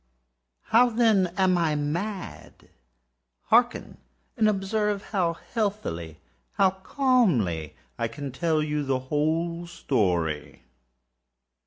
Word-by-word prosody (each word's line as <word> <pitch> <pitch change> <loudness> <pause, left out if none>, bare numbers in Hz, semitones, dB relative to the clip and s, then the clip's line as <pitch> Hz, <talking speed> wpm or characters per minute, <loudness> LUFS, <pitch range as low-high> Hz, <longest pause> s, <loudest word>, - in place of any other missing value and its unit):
How, 245 +2 +6
then, 220 -5 +3
am 185 -2 +3
I 160 -3 +1
mad? 175 +7 -5 0.8
Hearken! - - +2 0.4
and 215 - +3
observe 205 +1 -1
how 180 -5 +1 0.2
healthily—how 85 - -2
calmly 170 - +1 0.2
I - - 0
can 140 +4 -7
tell 155 +3 0
you 150 -1 -1
the 135 -1 0 0.2
whole 165 +3 0
story. 85 - -1
165 Hz, 95 wpm, -26 LUFS, 120-205 Hz, 0.8 s, How